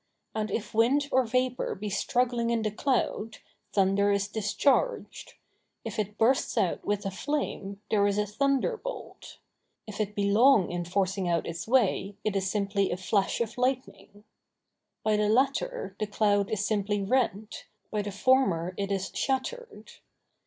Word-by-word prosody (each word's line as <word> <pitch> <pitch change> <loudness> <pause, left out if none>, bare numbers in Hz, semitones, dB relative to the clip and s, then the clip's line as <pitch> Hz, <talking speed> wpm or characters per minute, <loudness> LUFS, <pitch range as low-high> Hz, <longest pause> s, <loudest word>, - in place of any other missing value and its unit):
And 215 -1 -2
if 230 +1 -4
wind 255 +6 +3
or 260 -1 +3
vapor 255 +1 0
be 205 +1 -5
struggling 240 +3 0
in 230 -1 0
the 215 - 0
cloud, 225 -2 -1 0.3
thunder 200 +1 +3
is 200 0 +1
discharged; 220 - 0 0.5
if - - -4
it 210 0 -3
bursts 255 +4 +2
out - - +1
with 205 -1 -1
a 195 - -1
flame, 200 -4 -3
there 205 -1 +4
is 200 0 0
a 210 - +1
thunderbolt; 275 - -2 0.5
if 215 0 -5
it 210 0 -3
be 205 - 0
long 225 -2 +5
in 175 0 -3
forcing 190 +1 0
out 170 -1 +1
its 165 +4 -5
way, 220 -5 +2
it 215 -2 -1
is 190 -1 0
simply 200 -1 0
a 175 - -2
flash 195 +4 0
of 230 +1 -3
lightning. 250 -5 -2 0.8
By 215 -1 +2
the 210 0 +1
latter 270 - 0
the 215 - -1
cloud 205 -1 +1
is 205 -2 -1
simply 205 -1 0
rent, 220 -2 -1 0.3
by 210 - 0
the 205 0 -5
former 195 -6 +2
it 200 0 -2
is 195 -1 -2
shattered. 460 - -3
210 Hz, 160 wpm, -28 LUFS, 200-250 Hz, 0.8 s, long